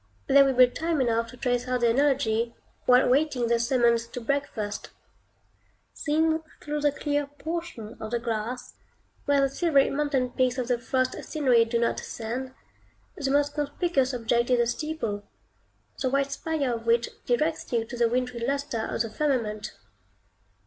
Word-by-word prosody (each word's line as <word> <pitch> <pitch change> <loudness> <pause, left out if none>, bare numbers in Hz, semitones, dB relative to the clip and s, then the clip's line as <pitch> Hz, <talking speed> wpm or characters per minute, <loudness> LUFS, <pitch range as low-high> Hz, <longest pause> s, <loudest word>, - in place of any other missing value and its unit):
There 275 0 +6
will 270 -1 +1
be 255 0 +8
time 320 +5 -2
enough 230 -2 +1
to 250 - -12
trace 245 0 -1
out 250 -1 0
the 235 -1 +4
analogy, 235 -4 +1 0.3
while 250 +1 +6
waiting 265 -2 +2
the 235 0 +2
summons 235 -1 +2
to 240 - -7
breakfast. 230 -5 -3 1.0
Seen 320 +1 +1 0.2
through 300 0 -3
the 290 0 +3
clear 290 0 -1
portion 310 -6 -6
of 220 - -5
the 240 - 0
glass, 230 +1 -4 0.5
where 285 -1 +3
the 275 - +4
silvery 280 0 +2
mountain 275 -3 0
peaks 255 0 +1
of 250 -1 -2
the 245 -1 +1
frost 255 +1 -1
scenery 255 -7 +3
do 230 +1 -1
not 235 0 0
ascend, 255 +3 -5 0.6
the 285 -7 -2
most 290 +1 +2
conspicuous 290 -2 0
object 235 0 0
is 250 - +4
the 235 - +3
steeple, 240 -5 -3 0.8
the 260 - +1
white 275 +1 +1
spire 280 -3 -1
of 230 0 -6
which 235 0 +3 0.2
directs 305 +6 0
you 230 -2 +1
to 245 - -8
the 235 -1 +2
wintry 250 0 -1
lustre 270 -1 -2
of - - -1
the 230 - -5
firmament. 230 -8 -1
255 Hz, 165 wpm, -27 LUFS, 235-285 Hz, 1.0 s, be